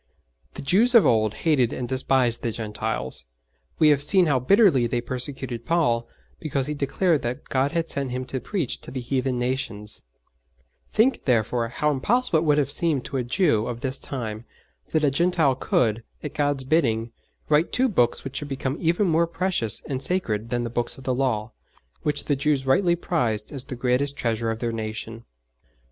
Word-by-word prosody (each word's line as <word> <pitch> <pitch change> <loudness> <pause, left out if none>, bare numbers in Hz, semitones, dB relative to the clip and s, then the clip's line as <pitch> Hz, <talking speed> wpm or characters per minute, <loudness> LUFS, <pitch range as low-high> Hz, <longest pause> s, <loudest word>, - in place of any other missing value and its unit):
The - - -7
Jews 220 - +4
of 230 - +8
old 110 -2 +2
hated 135 -7 +3
and 125 - -4
despised 130 -2 +1
the 115 - -1
Gentiles; 105 - -3 0.5
we 155 - +5
have 145 -2 +4
seen 180 +5 +6
how 140 -5 +2
bitterly 150 - +4
they 120 +1 -1
persecuted 125 -1 -5
Paul 120 -7 +1 0.3
because 140 -4 -2
he 150 - -2
declared 150 +3 +1
that 120 +1 -5
God 135 +3 +1
had 165 -1 0
sent 140 -4 -2
him 130 +1 -4
to 130 +1 -4
preach 180 - -3
to - - -10
the 130 - -5
heathen 130 +1 -1
nations; 120 - -3 0.9
think, 240 +5 +2
therefore, 120 -1 +1
how 150 +6 0
impossible 195 - +2
it 165 - -2
would 150 -1 +3
have 140 -1 +1
seemed 150 -4 +2
to 135 - -3
a 125 - 0
Jew 120 - +1
of 120 -1 -5
this 130 0 -1
time, 115 -4 -5 0.4
that 155 - 0
a 145 - +3
Gentile 170 -2 +2
could, 115 -3 0 0.2
at 150 - -5
God's 145 -2 0
bidding, 120 -6 +1 0.4
write 155 +3 +2
two 260 +1 +2
Books 120 - +1
which 135 - -5
should 145 - -4
become 135 +1 -3
even 170 +4 +1
more 170 -1 +2
precious 170 - 0
and 135 -2 -3
sacred 115 - -2
than 120 0 -1
the 120 - -4
Books 120 0 -2
of 135 - -12
the 130 - 0
Law, 120 -4 -1 0.5
which 145 -1 -2
the 145 - +1
Jews 140 -1 0
rightly 170 +6 +3
prized 120 -12 -1
as 135 -3 -4
the 130 - -6
greatest 130 +3 0
treasure 115 -1 -1
of 115 - -2
their 115 0 -2
nation! 110 +1 -6
130 Hz, 190 wpm, -24 LUFS, 120-150 Hz, 0.9 s, of